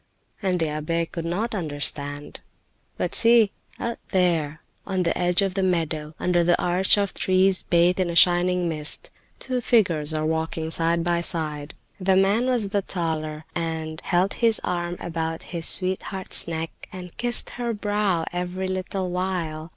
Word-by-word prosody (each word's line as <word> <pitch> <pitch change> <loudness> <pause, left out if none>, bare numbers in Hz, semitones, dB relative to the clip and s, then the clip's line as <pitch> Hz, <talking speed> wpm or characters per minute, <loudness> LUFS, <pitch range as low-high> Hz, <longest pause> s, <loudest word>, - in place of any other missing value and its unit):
And 185 -3 0
the 165 - +1
abbe 155 +3 -1
could 165 0 -6
not 200 +8 -2
understand. 145 -4 -3 0.6
But - - -2
see, 230 -3 +5 0.3
out 235 0 -3
there, 165 -5 +1 0.2
on 190 -1 -1
the 170 - 0
edge 180 +2 +2
of 195 -2 -1
the 195 - -1
meadow, 160 -4 -1
under 175 -1 +2
the 175 +1 +3
arch 180 +3 +3
of 200 -1 0
trees 185 0 +2
bathed 175 +2 +2
in 185 -2 +1
a 170 - -3
shining 180 0 +4
mist, 160 - +1 0.3
two 255 -1 -2
figures 170 -11 +2
are 155 0 -1
walking 160 0 -2
side 165 +1 +1
by 170 0 +1
side. 155 -3 -2 0.2
The 190 0 +2
man 200 +6 +3
was 240 -6 +1
the 200 0 0
taller, 155 -4 -3
and 160 -2 -3
held 185 +2 +1
his 230 -2 +2
arm 175 0 -2
about 165 -1 -4
his 165 -1 -1
sweetheart's 190 0 +2
neck 165 -1 -6
and 180 -2 -9
kissed 240 0 -1
her 240 -1 -3
brow 205 -5 0
every 180 +1 -3
little 185 0 -3
while. 175 -4 -3
175 Hz, 160 wpm, -24 LUFS, 160-190 Hz, 0.6 s, see